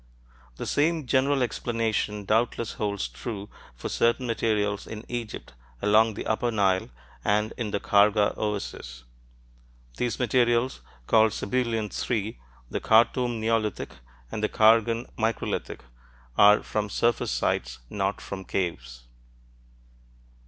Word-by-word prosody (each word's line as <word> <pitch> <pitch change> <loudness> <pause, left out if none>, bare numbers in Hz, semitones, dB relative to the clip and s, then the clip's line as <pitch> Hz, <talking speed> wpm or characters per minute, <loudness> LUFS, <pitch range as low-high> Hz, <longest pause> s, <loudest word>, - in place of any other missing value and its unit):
The - - -6
same 160 +1 +1
general 135 +1 +2
explanation 115 -4 -1
doubtless 115 +2 0
holds 100 - -2
true 100 - -7 0.3
for - - -5
certain 120 +2 +1
materials 105 -3 0
in 110 +1 -7
Egypt, 120 - -6 0.3
along 110 - +4
the - - -5
upper 110 +2 0
Nile 95 - +1 0.3
and 105 +1 +1
in 115 -3 -3
the 100 - -1
Kharga 105 +1 +3
oasis: 95 - -4 0.9
these 120 -2 -1
materials, 120 0 +1 0.2
called 110 - +4
Sebilian 115 -1 -1
III, 110 - -2 0.3
the - - -1
Khartoum 120 +1 +3
"neolithic," 110 -1 -1 0.4
and - - -4
the 105 - +2
Khargan 115 +2 +4
microlithic, 115 +1 -2 0.5
are 105 +6 +6
from 105 -1 -2
surface 120 +2 +1
sites, - - -1
not 100 +4 -2
from 95 -1 -6
caves. 65 -12 -4
110 Hz, 115 wpm, -26 LUFS, 100-115 Hz, 0.9 s, are